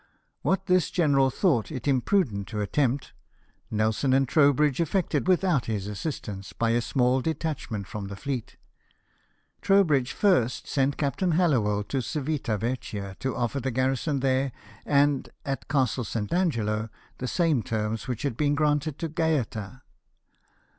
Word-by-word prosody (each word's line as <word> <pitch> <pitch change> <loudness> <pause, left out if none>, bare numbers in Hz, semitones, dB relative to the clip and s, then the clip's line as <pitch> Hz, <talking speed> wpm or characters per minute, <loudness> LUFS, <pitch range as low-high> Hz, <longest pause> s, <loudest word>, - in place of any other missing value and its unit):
What 190 0 0
this 185 -2 +3
general 140 -6 +3
thought 130 - +1
it 130 -3 -5
imprudent 130 - +1
to 105 - -4
attempt, 130 +5 0 0.6
Nelson 110 +5 +1
and 135 0 +3
Trowbridge 145 +1 +3
effected 180 +2 0
without 180 -6 +2
his 105 -4 -2
assistance 105 -3 -5
by 115 -1 0
a 120 +1 +2
small 125 +1 +2
detachment 150 -9 -3
from 100 +1 -6
the 100 - -6
fleet. 130 0 -5 1.0
Trowbridge 155 -11 +3
first 175 - +2
sent 135 0 +1
Captain 160 +5 0
Hallowell 120 - +2
to 135 +5 -2
Civita 140 -5 -2
Vecchia, 105 -4 -4
to 130 -1 -2
offer 120 +3 -1
the 130 +1 -2
garrison 130 +3 0
there 135 0 +1 0.4
and 145 -1 +2 0.2
at 135 -1 -3
Castle 130 -3 +1
St. 105 +1 -3
Angelo, 115 - 0 0.3
the 130 - -3
same 160 -4 +2
terms 110 0 -3
which 125 -3 -3
had 140 -5 -1
been 145 +2 +1
granted 150 0 +1
to 165 - -3
Gaeta. 130 -7 -2
135 Hz, 140 wpm, -26 LUFS, 115-150 Hz, 1.0 s, this